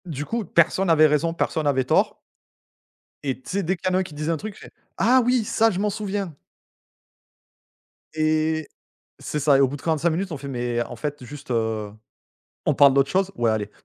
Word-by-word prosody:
Du 150 -4 -5
coup 230 +5 -3
personne 170 +3 +2
avait 155 -1 +6
raison, 155 +2 +2
personne 160 -2 -1
avait 135 -2 +2
tort. 125 - +1 1.1
Et 135 -2 -2
tu - - -13
sais 200 +1 -1
dès 185 +3 0
qu'il 170 - -4
y - - -2
en - - +3
a - - +2
un - - -1
qui 170 - -11
disait 150 +2 -2
un 165 - 0
truc 215 +5 -7
je - - -16
fais: - - -12 0.3
«Ah 250 +6 +4
oui 250 -1 +2
ça 225 +2 +3
je 185 - -3
m'en 210 +1 +1
souviens!» 200 -4 -3 1.8
Et 155 0 0 0.5
c'est 150 - -4
ça, 140 -1 +4
et - - +3
au 135 - +5
bout 140 - -5
de 135 - -14
45 165 0 +1
minutes 180 +3 -2
on - - -3
fait: 140 0 -8
«Mais 120 -2 -2
en 120 - -8
fait 145 +1 -5
juste, 140 +1 -11
heu, 110 -3 -1 0.7
on - - +3
parle 140 -2 +6
d'autre 140 0 +3
chose? 195 +1 +1
Ouais 115 -6 +2
allez». 105 -1 -2
155 Hz, 220 wpm, -23 LUFS, 135-185 Hz, 1.8 s, avait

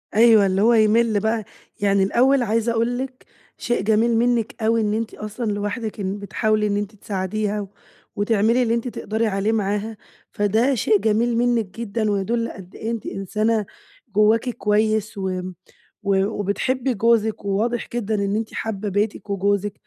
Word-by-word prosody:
أيوه، 220 -2 +6
اللي 190 +1 +1
هو 235 +2 +5
يِمِل 220 0 +3
بقى، 220 +1 0 0.4
يعني 200 -1 +3
الأول 255 +6 +3
عايزة 230 +1 +1
أقول 230 +2 0
لِك، 260 0 -6 0.3
شيء 240 - -1
جميل 225 +2 +2
منِك 235 -2 0
أوي 225 +1 +3
إن 210 0 0
أنتِ 225 0 -2
أصلًا 215 +1 -4
لوحدِك 205 +2 -3
إن 195 +1 -3
بتحاولي 210 +1 0
إن 205 0 0
أنتِ 205 +1 -4
تساعديها، 205 +1 -3 0.5
وتعملي 220 +4 +2
اللي 230 -1 +1
أنتِ 235 +1 -1
تقدَري 220 -1 -2
عليه 200 +2 0
معاها، 210 +1 -1 0.3
فده 220 +6 +2
شيء 215 -2 +3
جميل 225 +3 +1
منِك 240 -2 +2
جدًا 215 -1 -1
ويدُل 230 +4 -1
قد 190 -1 -12
إيه 225 - -4
أنتِ 230 -2 -4
إنسانة، 215 +2 -1 0.5
جوّاكِ 220 +4 +3
كويّس 215 0 0
و 185 -1 -2 0.6
و 200 -1 +2
وبتحبّي 240 +6 -1
جوزِك 220 -1 +1
وواضح 220 +4 -1
جدًا 220 -2 -1
إن 200 0 0
أنتِ 220 0 -3
حابّة 210 -2 -3
بيتِك 205 +2 -2
وجوزِك، 200 +1 0
215 Hz, 155 wpm, -22 LUFS, 205-230 Hz, 0.6 s, أيوه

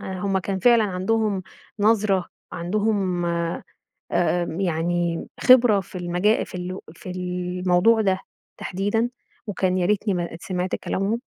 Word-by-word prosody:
هم 190 +1 -1
كان 190 +1 -3
فعلًا 230 +2 +5
عندهم 200 +1 0 0.4
نظرة، 205 -3 +2 0.3
عندهم 190 -1 0
آآ 170 0 -2 1.0
يعني 170 -1 0
خبرة 245 -5 +6
في 185 0 -8
المجا 180 +5 +1
في - - -15
ال 180 +1 -5 0.2
في 180 - -9
الموضوع 180 +3 +1
ده 190 -3 +1 0.4
تحديدًا، 205 +5 -1 0.4
وكان 185 -2 0
يا 175 - +1
ريتني 205 0 +1
ما 170 -2 -3
سمعت 185 0 -2
كلامهم؟ 205 +5 -2
185 Hz, 120 wpm, -23 LUFS, 180-210 Hz, 1.0 s, خبرة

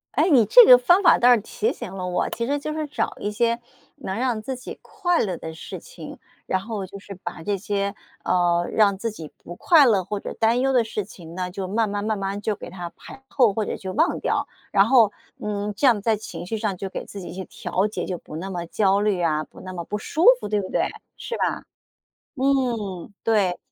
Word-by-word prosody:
诶， 310 +7 +3
你 255 -8 +6
这 - - +9
个 250 - +10
方 350 +10 +4
法 345 - +6
倒 245 +1 +6
是 235 - +3
提 215 +1 -2
醒 185 - -8
了 185 -1 -4
我， 180 0 -1
其 235 - -3
实 285 +3 -1
就 305 +2 -4
是 310 0 -2
找 295 - -2
一 205 - -2
些， 235 +2 0 0.3
能 210 -9 -5
让 240 -3 0
自 260 +4 -5
己 250 - -9
快 355 -5 -1
乐 185 -5 -2
的 160 - -7
事 160 - -8
情， - - -11 0.3
然 190 - 0
后 205 0 -5
就 200 +2 -10
是 200 0 -10
把 175 -2 -7
这 205 +2 -1
些， 200 0 -2 0.3
呃， 175 -1 +2
让 200 -3 +3
自 230 +4 -2
己 165 -8 -9
不 175 - -9
快 310 - +5
乐 205 -6 +3
或 205 +3 -4
者 - - -6
担 230 +2 +2
忧 270 +1 +1
的 245 -2 +4
事 215 -2 -4
情 170 -5 -12
呢， 180 0 -3
就 190 +1 -5
慢 215 +3 0
慢 205 0 -3
慢 215 -1 -1
慢 195 +1 -3
就 215 +1 0
给 - - -9
它 175 -1 -7
排 270 - -12
后， 245 -7 +3
或 220 - -1
者 - - -4
就 190 -1 -6
忘 320 +4 +1
掉， - - 0 0.3
然 195 -1 +5
后， 225 -4 +5 0.3
嗯， 210 0 -3
这 275 - +3
样 230 -5 +4
在 220 +1 +1
情 205 - -8
绪 220 +5 -3
上 210 -3 -2
就 190 +2 -5
给 - - -6
自 200 - -9
己 180 - -8
去 190 +1 -6
调 190 +3 -2
节， 215 - -4
就 180 - -3
不 155 - -11
那 180 +5 -5
么 175 -3 -4
焦 195 +2 +2
虑 205 -3 +1
啊， 155 -2 +1
不 - - -15
那 185 - -8
么 175 -2 -6
不 210 - -3
舒 310 - -1 0.2
服， - - -5
对 210 0 +1
不 190 - -6
对？ - - 0 0.3
是 470 - -5
吧？ - - -1 0.7
嗯。 240 - -1
对。 200 -5 +2
210 Hz, 255 characters per minute, -23 LUFS, 190-240 Hz, 0.7 s, 个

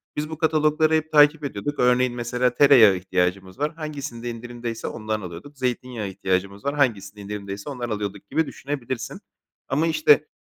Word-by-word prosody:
Biz 150 +1 -3
bu 160 - -6
katalogları 155 0 +2
hep 155 0 +1
takip 150 0 +5
ediyorduk. 140 +3 -4
Örneğin, 125 0 +3
mesela, 125 +1 0
tereyağı 125 -9 +7
ihtiyacımız 95 +3 -1
var; 150 +2 0
hangisinde 140 -7 -5
indirimdeyse 120 0 -6
ondan 110 -1 -3
alıyorduk. 90 - -9
Zeytinyağı 125 -3 -2
ihtiyacımız 95 +1 -2
var; 140 +1 0
hangisinde 105 -7 0
indirimdeyse 100 +2 -6
ondan 125 -4 -4
alıyorduk 100 -2 -4
gibi 160 +3 +1
düşünebilirsin. 130 -3 -5 0.5
Ama, 150 +5 +1
işte, 155 -1 +4
125 Hz, 150 wpm, -24 LUFS, 105-145 Hz, 0.5 s, tereyağı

